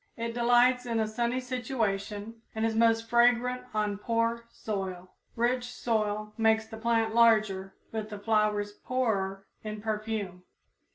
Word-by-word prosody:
It 230 0 -3
delights 245 +1 +4
in 230 -1 0
a 220 - +2
sunny 235 +3 -1
situation, 225 -4 -3
and 220 0 0
is 225 - +1
most 225 0 +3
fragrant 245 +1 +3
on 210 -2 -1
poor 230 +1 0
soil. 190 -5 -5 0.2
Rich 245 +1 +1
soil 215 -3 -2
makes 220 0 +3
the 220 0 -9
plant 225 -1 +1
larger 215 -5 +3 0.2
but 220 -1 -4
the 210 - -6
flowers 210 -1 +1
poorer 200 -5 -2 0.2
in 215 0 -5
perfume. 215 -4 -3
225 Hz, 135 wpm, -29 LUFS, 210-235 Hz, 0.2 s, delights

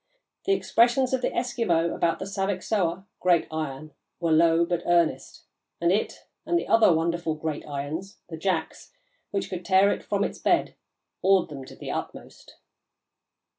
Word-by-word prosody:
The 390 - +3
expressions 250 -5 +2
of 260 - +1
the - - +1
Eskimo 230 -9 0
about 165 -1 0
the 190 - -5
Saviksoah 195 -2 -1
(Great 175 -2 +3
Iron) 155 -1 -5 0.3
were 170 -2 0
low 165 +1 +4
but 175 0 -1
earnest, 170 -2 +1 0.4
and 170 +1 +2
it, 205 +3 -1 0.2
and 345 - +1
the - - -3
other 225 -4 +5
wonderful 165 0 0
'Great 155 -1 -4
Irons' 150 +7 -5
(the 165 - -7
jacks) 165 - -3 0.4
which 195 - -2
could 180 -1 -6
tear 190 +2 +4
it - - -3
from - - -1
its - - -4
bed, - - +1 0.5
awed 190 -3 +3
them 135 -3 -8
to - - -12
the - - -6
utmost." - - -7
175 Hz, 160 wpm, -26 LUFS, 160-195 Hz, 0.5 s, other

